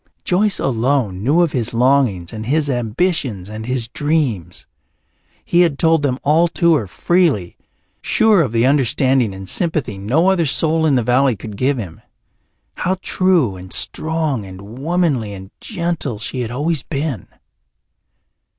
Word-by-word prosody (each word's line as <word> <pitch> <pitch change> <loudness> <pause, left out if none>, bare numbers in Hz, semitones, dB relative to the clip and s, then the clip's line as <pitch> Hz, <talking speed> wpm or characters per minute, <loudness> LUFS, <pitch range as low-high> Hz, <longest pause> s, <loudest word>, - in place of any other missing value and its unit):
Joyce 195 +2 +1
alone 120 -6 0
knew 145 +10 +3
of 170 -4 +2
his 120 -2 -2
longings 120 -8 +2
and 110 0 -6
his 145 +1 +1
ambitions 120 - -1
and 110 +1 -7
his 125 -2 -1
dreams; 125 - -2 0.8
he 175 - +3
had 165 -6 +2
told 165 0 +3
them 135 -3 0
all 160 +4 +3
to 170 0 +2
her 125 -10 0
freely, 145 - +1 0.5
sure 215 -5 +3
of 135 -8 -1
the 115 +1 +2
understanding 130 -3 +2
and 95 0 -9
sympathy 150 - -1
no 150 - +2
other 170 -4 +1
soul 160 +3 +1
in 145 - +3
the 125 - +2
valley 125 +2 +2
could 105 +1 -9
give 130 +5 0
him. 95 -9 -7 0.7
How 185 +2 -1
true 175 - +2
and 90 0 -11
strong 155 -7 -1
and 100 +5 -11
womanly 145 - 0
and 95 0 -10
gentle 170 - -3
she 115 +4 -5
had 115 - -3
always 145 +4 -1
been! 140 - -4
135 Hz, 150 wpm, -18 LUFS, 110-160 Hz, 0.8 s, knew